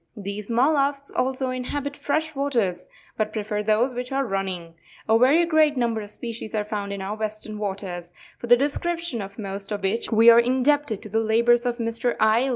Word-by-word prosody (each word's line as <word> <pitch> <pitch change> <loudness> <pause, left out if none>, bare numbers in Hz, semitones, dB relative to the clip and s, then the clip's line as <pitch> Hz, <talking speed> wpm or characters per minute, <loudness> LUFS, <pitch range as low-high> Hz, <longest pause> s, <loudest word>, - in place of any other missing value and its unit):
These 200 +1 -6
mollusks 280 +3 +2
also 260 0 -1
inhabit 280 +3 -4
fresh 315 +2 -1
waters, 235 -11 -1 0.3
but 215 -1 -1
prefer 210 -1 -2
those 220 +5 +1
which 250 +1 -5
are 270 0 0
running. 190 -5 -3 0.3
A 220 - +4
very 290 +8 +5
great 310 -3 +3
num 235 -2 +1
ber 220 - -3
of 205 - -9
species 225 0 -5
are 210 - 0
found 205 -1 -4
in 200 -1 -4
our 200 +2 -3
Western 215 0 -5
waters, 190 -4 -5 0.3
for 240 - -6
the 245 +1 +7
descrip 295 +6 0
tion 335 -10 -3
of 195 0 -8
most 200 -1 -6
of 205 -1 -3
which 210 +4 -1
we 225 +1 +7
are 230 - +7
indebted 260 -1 +1
to 215 - -8
the 220 +2 +1
labours 235 +2 +3
of 240 -1 -1
Mr. 230 +1 -1
I. 220 +5 +3
230 Hz, 200 wpm, -24 LUFS, 210-265 Hz, 0.3 s, the